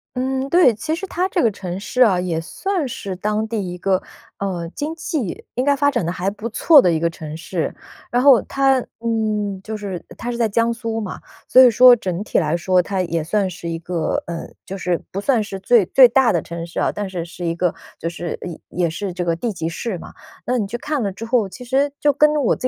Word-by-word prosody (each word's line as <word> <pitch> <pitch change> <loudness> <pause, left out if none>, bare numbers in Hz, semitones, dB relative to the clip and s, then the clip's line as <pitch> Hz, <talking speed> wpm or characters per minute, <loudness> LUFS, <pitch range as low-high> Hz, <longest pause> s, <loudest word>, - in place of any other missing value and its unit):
嗯， 265 +1 -1
对。 340 -9 +5
其 315 +9 -2
实 385 +3 -5
它 365 +1 -1
这 - - +1
个 225 - +3
城 185 -1 -6
市 250 +5 -2
啊， 195 -7 +5
也 170 -3 -1
算 345 - -2
是 195 -5 -5
当 210 +3 -1
地 205 -6 -3
一 180 - -6
个， 190 +1 +1 0.4
呃， 180 -4 -3
经 305 +3 -3
济 310 - -4
应 250 - -1
该 285 0 +3
发 285 +1 +2
展 175 - -1
得 170 - -1
还 185 +2 -1
不 210 +3 -6
错 290 +5 +6
的 175 - +3
一 160 - +1
个 170 0 +1
城 155 -2 -8
市。 170 0 -3 0.4
然 245 +1 +2
后 275 -5 +7
它， 270 -1 +2 0.2
嗯， 215 -4 -1
就 220 0 -5
是 195 -4 -6
它 245 +1 -4
是 235 - -4
在 230 -2 +1
江 230 +3 +1
苏 230 -1 -3
嘛， 205 -4 -5 0.3
所 260 - +7
以 250 - +9
说 245 +2 +8
整 185 -3 -3
体 - - +1
来 160 0 0
说， 185 0 +2
它 190 +1 -2
也 165 -2 -2
算 195 +4 0
是 170 -1 -7
一 165 - -2
个， 170 -1 -2
嗯， 170 -1 -7
就 195 - -6
是 180 -2 -1
不 195 - -3
算 235 -3 +2
是 195 -2 -6
最 215 0 +4
最 255 +6 +7
大 265 0 +4
的 170 - +1
城 170 0 -6
市 170 - -5
啊， - - +1
但 205 -1 -4
是 175 -3 -4
是 175 +1 -7
一 165 - 0
个 175 0 0 0.3
就 165 - -2
是 175 0 -5
也 175 -3 -7 0.3
也 - - 0
是 185 +2 -4
这 180 0 -3
个 170 -1 0
地 225 +6 -3
级 165 -3 -3
市 185 +1 -4
嘛， - - -11 0.3
那 250 0 +1
你 210 - 0
去 230 +5 -4
看 295 -5 -2
了 200 - -1
之 220 +4 -7
后， 230 -3 +2
其 250 +6 -10
实 275 +3 +1
就 295 - +4
跟 300 +2 +4
我 285 -6 +2
着 255 - -1
205 Hz, 265 characters per minute, -20 LUFS, 175-250 Hz, 0.4 s, 以